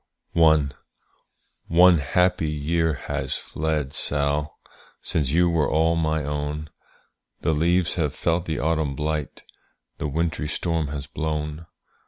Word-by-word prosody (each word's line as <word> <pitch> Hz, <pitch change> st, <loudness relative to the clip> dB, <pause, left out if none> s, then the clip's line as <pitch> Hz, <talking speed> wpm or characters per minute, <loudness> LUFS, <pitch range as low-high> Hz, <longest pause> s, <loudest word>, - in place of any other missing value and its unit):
One 80 Hz, -4 st, +4 dB, 1.3 s
happy 80 Hz, +3 st, +1 dB
year 80 Hz, +2 st, 0 dB
has -, -, -2 dB
fled, 75 Hz, -3 st, -2 dB
Sall, 75 Hz, +1 st, -1 dB, 0.4 s
Since 75 Hz, -5 st, 0 dB
you 85 Hz, +4 st, +3 dB
were 80 Hz, -4 st, +2 dB
all 80 Hz, +1 st, +2 dB
my 80 Hz, -1 st, 0 dB
own, 75 Hz, +1 st, -3 dB, 0.7 s
The 80 Hz, -, +1 dB
leaves 85 Hz, +3 st, +2 dB
have 75 Hz, -3 st, -1 dB
felt 85 Hz, +1 st, 0 dB
the 80 Hz, -2 st, -2 dB
autumn 80 Hz, -3 st, 0 dB
blight, 75 Hz, 0 st, -3 dB, 0.6 s
The 75 Hz, -, -1 dB
wintry 80 Hz, +1 st, -1 dB
storm 80 Hz, 0 st, -1 dB
has 70 Hz, 0 st, -5 dB
blown. 75 Hz, +2 st, -4 dB
80 Hz, 120 wpm, -24 LUFS, 75-80 Hz, 1.3 s, One